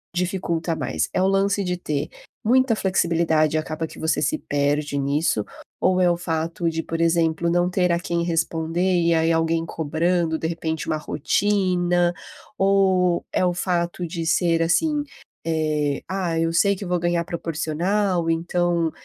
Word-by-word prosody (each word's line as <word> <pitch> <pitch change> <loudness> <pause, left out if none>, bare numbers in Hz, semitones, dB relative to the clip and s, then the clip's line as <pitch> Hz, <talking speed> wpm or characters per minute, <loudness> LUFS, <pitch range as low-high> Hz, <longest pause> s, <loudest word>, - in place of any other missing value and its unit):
dificulta 175 -2 -1
mais? 80 - -2
É 185 - +1
o 190 - +3
lance 195 +1 +1
de 180 0 -1
ter 150 -5 -3 0.3
muita 250 0 +3
flexibilidade 165 -5 +1
e - - +2
acaba 155 +1 -4
que - - -13
você 160 -2 0
se 150 - +1
perde 145 0 -1
nisso 140 -5 0 0.4
ou 185 0 +3
é 180 - +4
o 175 - +2
fato 165 0 -2
de, 165 0 -2
por 165 0 -4
exemplo, 165 0 +2
não 175 +1 +2
ter 180 -1 +1
a 170 - +1
quem 170 -1 -2
responder 165 +2 0
e 170 0 +3
aí 165 0 +2
alguém 165 0 +1
cobrando 160 +1 0
de 160 - -2
repente 160 -1 -3
uma - - 0
rotina, 175 +2 +1 0.4
ou 190 -2 +2
é - - +2
o 180 - +1
fato 175 -1 -1
de 165 0 -4
ser 165 0 +2
assim, 295 - +1 0.4
eh, 155 -3 0
"ah, 180 -3 -1
eu 165 0 +1
sei 200 +4 +3
que 195 - -7
vou 180 - +1
ganhar 175 0 0
proporcional, 170 +3 -1
então 170 0 0
170 Hz, 165 wpm, -23 LUFS, 160-180 Hz, 0.4 s, é